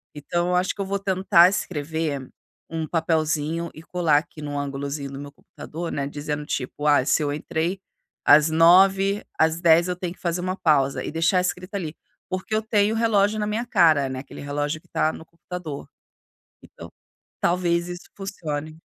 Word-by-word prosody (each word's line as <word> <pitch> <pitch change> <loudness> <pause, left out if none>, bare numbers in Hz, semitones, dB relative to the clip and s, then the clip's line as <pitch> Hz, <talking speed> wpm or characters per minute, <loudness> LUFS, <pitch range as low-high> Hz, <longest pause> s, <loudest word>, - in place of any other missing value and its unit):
Então 175 +4 -2
eu 180 - +1
acho 180 +1 +1
que 200 - -6
eu - - -1
vou 200 +1 -2
tentar 185 -3 +5
escrever 155 -6 -3 0.4
um 160 -1 -3
papelzinho 160 0 0
e 155 - -12
colar 170 -4 +2
aqui 155 0 -5
num 145 -1 -4
angulozinho 140 0 -4
do 135 - -7
meu 145 0 -8
computador, 165 +3 -8
né, 140 -1 -2
dizendo 145 +1 -4
tipo: 145 +2 -3
"Ah, 145 -3 +4
se 155 - +2
eu 145 - -1
entrei 165 +5 -2 0.5
às 150 +2 +7
9:00, 190 +5 +5
às 160 +1 +2
10:00 170 0 +5
eu 180 - -1
tenho 180 -1 -5
que - - -25
fazer 175 0 -2
uma 185 +1 -2
pausa" 140 -6 +2
e - - -4
deixar 165 +3 +2
escrito 180 +2 -3
ali. 165 -5 -4 0.3
Porque 185 +4 -3
eu 215 - +1
tenho 215 -1 +2
o - - -1
relógio 215 -2 +2
na 210 - 0
minha 220 +3 -2
cara, 155 - +4
né, 130 - -4
aquele 135 - -10
relógio 145 +2 -3
que - - -28
tá 155 - 0
no - - -9
computador. 165 -3 -8 0.8
Então - - -12 0.5
talvez 170 -1 +1
isso 175 0 -8
funcione. 155 -6 -5
165 Hz, 185 wpm, -24 LUFS, 150-180 Hz, 0.8 s, às